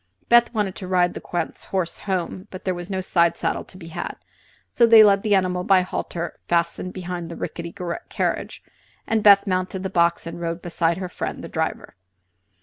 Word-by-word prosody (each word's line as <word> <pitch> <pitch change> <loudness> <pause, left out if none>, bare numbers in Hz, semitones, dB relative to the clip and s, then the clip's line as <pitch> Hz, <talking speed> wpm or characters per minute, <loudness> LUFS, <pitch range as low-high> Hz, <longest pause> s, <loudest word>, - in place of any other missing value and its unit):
Beth 235 0 +6
wanted 210 -5 -1
to 185 - -7
ride 180 -1 +2
the - - -7
Count's 170 -2 -4
horse 185 -3 -2
home, 185 0 -3
but 185 - -10
there 185 - +1
was 175 +1 -7
no 190 -1 -2
side 170 -2 +2
saddle - - -1
to 185 - -14
be 165 -3 -10
had, 175 +1 -5 0.6
so 235 - +4
they 225 -1 +9
led 200 -2 +5
the 210 -1 +2
animal 180 -1 +1
by 190 0 +5
a - - -2
halter 175 -2 -5
fastened 170 +1 0
behind 180 -2 -5
the 170 - -7
ricketty 170 0 -5 0.4
carriage, - - -2 0.4
and 225 -1 +1
Beth 200 -1 +7
mounted 185 0 -2
the 190 - -3
box 170 -2 +2
and 170 +1 -7
rode 170 0 -2
beside 170 -1 0
her 185 -1 -4
friend 180 - -5
the - - -6
driver. - - -3
185 Hz, 200 wpm, -23 LUFS, 170-195 Hz, 0.6 s, they